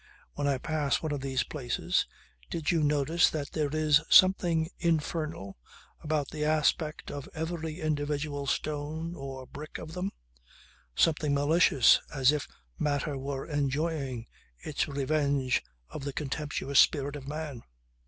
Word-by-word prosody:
When 145 - -1
I 140 -2 +2
pass 150 +2 -1
one 155 - -1
of 145 -2 -2
these 135 -1 0
places... 130 -5 -1 0.4
did 165 0 -1
you 165 -2 +2
notice 150 +3 +3
that 145 -3 -4
there 150 -2 0
is 155 -1 +3
something 175 -4 +5
infernal 155 - -1 0.4
about 150 -2 -1
the 150 -1 -3
aspect 155 0 +1
of 140 -2 -6
every 160 0 -4
individual 145 -2 -2
stone 155 +4 -2
or 135 -4 -7
brick 150 +4 -8
of 160 0 -8
them, 185 +2 -2 0.9
something 150 -3 +2
malicious 145 -3 +5
as 135 -1 +4
if 150 -2 -2 0.3
matter 145 0 0
were 135 0 -4
enjoying 140 -4 -1 0.3
its 145 - -2
revenge 140 -2 +1 0.3
of 145 - -7
the 140 -1 -4
contemptuous 140 -1 -1
spirit 145 -1 +4
of 140 -2 -8
man. 150 -4 -5
150 Hz, 135 wpm, -29 LUFS, 140-155 Hz, 0.9 s, something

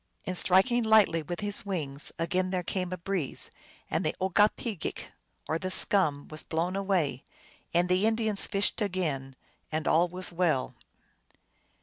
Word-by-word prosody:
And 185 - -3
striking 195 +8 +4
lightly 220 -7 +4
with 175 +5 -6
his 205 0 -1
wings, 150 -8 -3
again 180 +3 0
there 185 -1 -2
came 180 +1 -2
a 185 - -3
breeze, 175 -4 -3 0.4
and - - -1
the - - -1
OgokpcgeaJc, 205 +1 0 0.5
or 160 - -1
the 185 - -3
scum, 175 -7 +3
was 155 0 -1
blown 170 +3 -2
away, 185 -10 0 0.5
and 175 +1 +2
the 185 +4 +3
Indians 220 -2 +1
fished 200 +2 0
again, 155 -10 -2 0.4
and 155 0 -2
all 170 +2 +4
was 180 +1 -3
well. 170 -6 0
185 Hz, 145 wpm, -29 LUFS, 160-195 Hz, 0.5 s, striking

